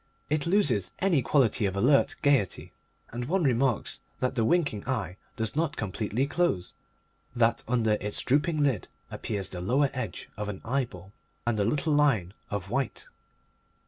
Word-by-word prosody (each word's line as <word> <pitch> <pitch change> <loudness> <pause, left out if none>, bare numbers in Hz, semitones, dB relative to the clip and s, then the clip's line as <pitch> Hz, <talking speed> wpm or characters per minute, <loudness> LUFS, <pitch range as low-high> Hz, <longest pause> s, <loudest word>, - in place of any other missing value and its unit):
It 155 0 +1
loses 145 - +2
any 180 -8 +2
quality 120 -5 +2
of 95 - -3
alert 130 +8 +3
gaiety, 135 -10 +1 0.4
and 120 +1 -4
one 180 +6 +1
remarks 130 -3 +1 0.2
that 130 0 0
the 120 -4 +1
winking 135 - +1
eye 100 -8 -2 0.2
does 110 +1 -1
not 160 -1 0
completely 110 +5 -1
close, 140 - 0 0.6
that 115 -1 +2
under 120 -3 +2
its 105 0 -2
drooping 150 +3 +2
lid 130 -9 0 0.2
appears 100 -4 -3
the 90 - -6
lower 130 +9 +2
edge - - -5
of 105 0 -3
an 95 - -5
eyeball 110 -7 -3 0.3
and 120 -3 0
a - - +3
little 150 +7 +1
line 125 -12 +2 0.2
of 100 -2 -4
white. 135 -1 -2
120 Hz, 155 wpm, -28 LUFS, 105-145 Hz, 0.6 s, alert